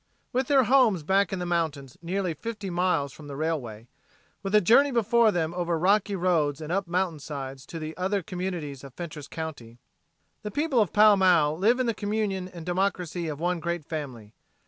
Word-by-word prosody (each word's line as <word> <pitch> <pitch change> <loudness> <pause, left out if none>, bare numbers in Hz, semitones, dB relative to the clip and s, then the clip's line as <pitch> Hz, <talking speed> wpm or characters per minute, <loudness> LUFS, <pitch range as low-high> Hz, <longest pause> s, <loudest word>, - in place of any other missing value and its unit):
With 255 +1 0
their 275 -2 +5
homes 235 - +4
back 190 +2 +2
in 190 - -2
the 180 - -3
mountains 155 -6 -2
nearly 180 0 -2
fifty 210 +2 -6
miles 170 -6 0
from 150 - -12
the 140 - -7
railway, 135 -8 -3 0.6
with 195 +1 -1
a - - +8
journey 240 +9 +5
before 235 -2 +3
them 165 -3 -1
over 175 -1 -1
rocky 200 +4 +2
roads 165 -6 +1
and 155 0 -6
up 195 0 0
mountainsides 150 -7 -3
to 165 - -7
the 155 0 -6
other 190 +1 -1
communities 170 -6 -5
of 135 -2 -12
Fentress 155 -4 -7
county, 145 -8 -7 0.6
the 210 - -5
people 290 +2 0
of 205 - 0
Pall 210 -1 +6
Mall 170 -6 +4
live 220 +9 +2
in 255 - +1
the 230 - +1
communion 205 -3 -2
and 170 -3 -10
democracy 180 -2 -1
of 150 -2 -5
one 175 +1 0
great 170 -1 -3
family. 130 -10 -6
175 Hz, 190 wpm, -26 LUFS, 155-200 Hz, 0.6 s, a